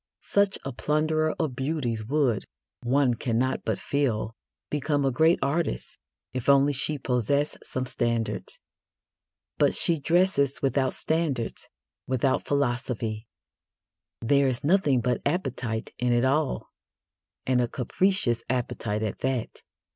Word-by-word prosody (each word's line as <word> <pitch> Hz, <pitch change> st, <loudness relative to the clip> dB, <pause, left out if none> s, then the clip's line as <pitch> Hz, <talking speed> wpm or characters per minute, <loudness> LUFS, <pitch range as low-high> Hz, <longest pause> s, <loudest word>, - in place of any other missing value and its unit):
Such 200 Hz, -1 st, +2 dB
a 135 Hz, -, -2 dB
plunderer 155 Hz, +4 st, 0 dB
of 155 Hz, -7 st, -1 dB
beauties 130 Hz, -5 st, -2 dB
would, 135 Hz, -6 st, +1 dB, 0.4 s
one 130 Hz, +1 st, +2 dB
cannot 120 Hz, +2 st, -1 dB
but -, -, -1 dB
feel, 115 Hz, -6 st, -1 dB, 0.4 s
become 145 Hz, -1 st, 0 dB
a 135 Hz, -, +2 dB
great 160 Hz, +6 st, +4 dB
artist 140 Hz, -, -2 dB, 0.3 s
if 130 Hz, +1 st, -2 dB
only 140 Hz, +1 st, +5 dB
she 150 Hz, +2 st, +1 dB
possessed 135 Hz, +3 st, 0 dB
some 130 Hz, 0 st, -3 dB
standards. 115 Hz, -2 st, -1 dB, 1.0 s
But -, -, +4 dB
she 165 Hz, -2 st, +3 dB
dresses 160 Hz, -3 st, +2 dB
without 135 Hz, -1 st, +1 dB
standards, 155 Hz, -7 st, -1 dB, 0.4 s
without 130 Hz, +1 st, +1 dB
philosophy: 120 Hz, -5 st, -1 dB, 0.9 s
there 140 Hz, +4 st, +3 dB
is 125 Hz, -2 st, -1 dB
nothing 145 Hz, -6 st, +3 dB
but 125 Hz, +1 st, 0 dB
appetite 130 Hz, -8 st, -2 dB
in 125 Hz, 0 st, +2 dB
it 120 Hz, +2 st, +3 dB
all, 140 Hz, +2 st, 0 dB, 0.7 s
and 130 Hz, -1 st, +2 dB
a 120 Hz, -, +1 dB
capricious 125 Hz, -, 0 dB
appetite 115 Hz, -4 st, -1 dB
at 105 Hz, -, -3 dB
that. 130 Hz, -3 st, -2 dB
130 Hz, 125 wpm, -26 LUFS, 120-150 Hz, 1.0 s, only